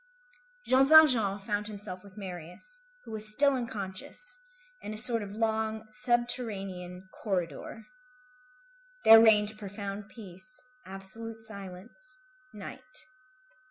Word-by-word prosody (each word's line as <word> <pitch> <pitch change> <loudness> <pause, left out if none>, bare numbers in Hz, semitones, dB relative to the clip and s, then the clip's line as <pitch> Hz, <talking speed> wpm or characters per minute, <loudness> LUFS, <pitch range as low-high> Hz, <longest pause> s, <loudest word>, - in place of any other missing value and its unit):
Jean 260 +1 +5
Valjean 255 -11 +7
found 205 +1 -2
himself 200 -3 -8
with 200 0 -16
Marius, 185 - -9 0.2
who - - -11
was 215 -1 +2
still 280 +5 +3
unconscious, 235 - -5 0.4
in 215 - -6
a - - -7
sort 230 +1 +4
of 205 0 -7
long, 220 0 -1
subterranean 210 -6 -2
corridor. 185 +2 -3 1.2
There 225 0 +11
reigned 215 -1 +4
profound 200 0 -6
peace, 215 +8 -6 0.3
absolute 220 +4 -8
silence, 220 - -11 0.3
night. 255 +4 -10
215 Hz, 105 wpm, -30 LUFS, 195-240 Hz, 1.2 s, There